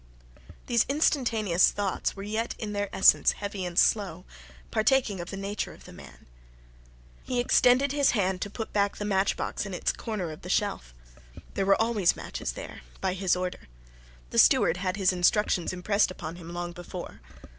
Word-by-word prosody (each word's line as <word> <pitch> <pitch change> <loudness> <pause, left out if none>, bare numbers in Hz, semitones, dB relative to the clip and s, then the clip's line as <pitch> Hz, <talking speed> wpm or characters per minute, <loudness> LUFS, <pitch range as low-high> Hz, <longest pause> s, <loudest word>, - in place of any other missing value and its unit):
These 235 -2 +3
instantaneous 230 - +2
thoughts 200 -2 -2
were 195 - -7
yet 220 +3 -2
in 210 -2 -5
their 205 -1 -2
essence 190 - +5
heavy 200 -2 -5
and 175 -1 -5
slow, 190 -4 +2 0.5
partaking 220 -2 +2
of 175 - -6
the 195 - -6
nature 200 +2 -4
of - - -16
the - - -12
man. - - -14 1.0
He 250 -1 -2
extended 250 +2 +4
his 285 -1 +3
hand 190 -2 0
to 205 - -3
put 220 +2 -6
back 200 -1 +1
the 205 - -4
matchbox 195 -1 0
in 195 -3 -5
its - - 0
corner 205 -8 -4
of 155 - -10
the - - -9
shelf. - - -1 0.6
There 195 -1 -1
were 195 - +4
always 220 -5 +2
matches - - -5
there - - -9 0.2
by 190 -1 -1
his 185 -1 +1
order. 180 0 -5 0.6
The - - +2
steward 170 - +5
had 185 +1 -2
his 190 -2 +2
instructions 180 0 +2
impressed 200 +3 +1
upon 175 -2 -7
him 170 -1 -10
long 175 0 -4
before. 175 - -9
195 Hz, 175 wpm, -27 LUFS, 180-215 Hz, 1.0 s, essence